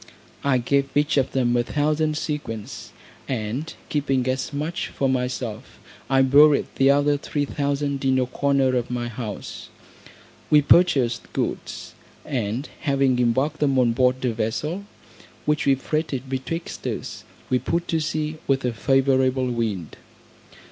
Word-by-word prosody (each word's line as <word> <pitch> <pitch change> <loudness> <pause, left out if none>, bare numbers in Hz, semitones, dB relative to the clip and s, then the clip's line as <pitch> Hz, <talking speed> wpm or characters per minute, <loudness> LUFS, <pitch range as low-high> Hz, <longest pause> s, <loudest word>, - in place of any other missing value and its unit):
I 140 -2 +3
gave 135 +3 +1
each 150 +1 +2
of 135 -1 +2
them 125 -2 +1
a 120 - +3
thousand 150 +4 0
sequins, 125 -6 -5 0.4
and 125 +5 -3 0.2
keeping 135 -4 0
as 130 0 -1
much 150 +4 -3
for 135 - -1
myself, 125 -2 -3 0.3
I 135 -1 +4
buried 145 +2 +6
the 135 0 +5
other 145 +1 +3
three 145 0 -2
thousand 140 -1 -2
in 130 -1 +3
a 130 - +2
corner 135 0 +1
of 125 -1 -1
my 120 -1 -3
house. 110 -3 -7 0.8
We 150 -1 +6
purchased 135 -8 +3
goods, - - -4 0.3
and 120 +1 -2
having 135 -3 +1
embarked 130 +6 +1
them 140 -3 +2
on 120 -2 +3
board 130 +1 +2
a 120 - +1
vessel, 150 - -2 0.6
which 150 -1 +1
we 135 - +5
freighted 140 -1 -3
betwixt 135 +6 -4
us, - - -5 0.3
we 125 - +3
put 170 +7 -1
to 165 - +1
sea 155 0 -2
with 135 -1 +1
a 125 - 0
favourable 130 0 +2
wind. 110 -9 -3
135 Hz, 145 wpm, -23 LUFS, 125-145 Hz, 0.8 s, buried